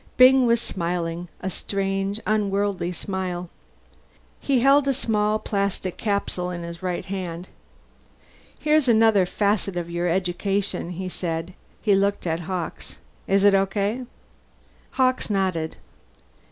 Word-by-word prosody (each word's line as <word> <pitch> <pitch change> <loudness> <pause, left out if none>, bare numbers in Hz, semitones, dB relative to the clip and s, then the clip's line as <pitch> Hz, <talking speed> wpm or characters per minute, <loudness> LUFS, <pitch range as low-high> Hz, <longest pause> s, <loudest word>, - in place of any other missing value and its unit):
Byng 255 0 +7
was 235 0 +4
smiling 175 -3 -3
a 190 - -2
strange 195 +2 -2
unworldly 200 -4 0
smile. 180 -1 -4 0.9
He 265 -4 +1
held 275 +2 +5
a 275 - +2
small 215 -4 +1
plastic 200 -3 -2
capsule 200 -4 -1
in 175 -1 -5
his 170 +1 -7
right 180 -1 -2
hand. 185 -2 -5 1.1
"Here's 305 -2 +2
another 220 -5 +5
facet 200 -2 0
of 170 -1 -4
your 175 +1 -1
education," 190 +1 -1
he 185 +1 -5
said. 170 -1 -3 0.3
He 210 - +4
looked 200 0 +1
at 165 -1 0
Hawkes. 170 - -5 0.3
"Is 195 0 +3
it 205 -1 +6
okay?" 200 +5 +1 0.9
Hawkes 255 -2 +1
nodded. 185 -6 0
195 Hz, 125 wpm, -24 LUFS, 180-210 Hz, 1.1 s, Byng